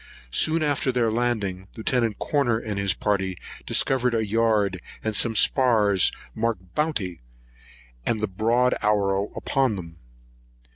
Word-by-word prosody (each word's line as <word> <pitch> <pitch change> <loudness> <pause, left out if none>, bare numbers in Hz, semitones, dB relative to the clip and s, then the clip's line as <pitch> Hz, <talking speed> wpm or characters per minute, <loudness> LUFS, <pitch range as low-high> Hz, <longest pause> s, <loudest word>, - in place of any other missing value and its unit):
Soon 160 - +2
after 145 -3 +1
their 120 -3 +1
landing, 105 -6 -2
Lieut. 115 -1 0
Corner 135 -6 +1
and 110 -3 -4
his 100 -2 +1
party 95 -3 -1 0.3
discovered 125 -2 +2
a 110 -1 0
yard 105 -4 +1 0.2
and 110 -1 -2
some 115 0 +3
spars 105 -6 +3 0.2
marked 110 -6 -3
Bounty, 110 - -2 0.8
and 110 - 0
the 110 - -1
broad 115 +6 +1
arrow 100 -1 +1
upon 135 -5 0
them. 85 -3 -9
110 Hz, 130 wpm, -24 LUFS, 100-120 Hz, 0.8 s, some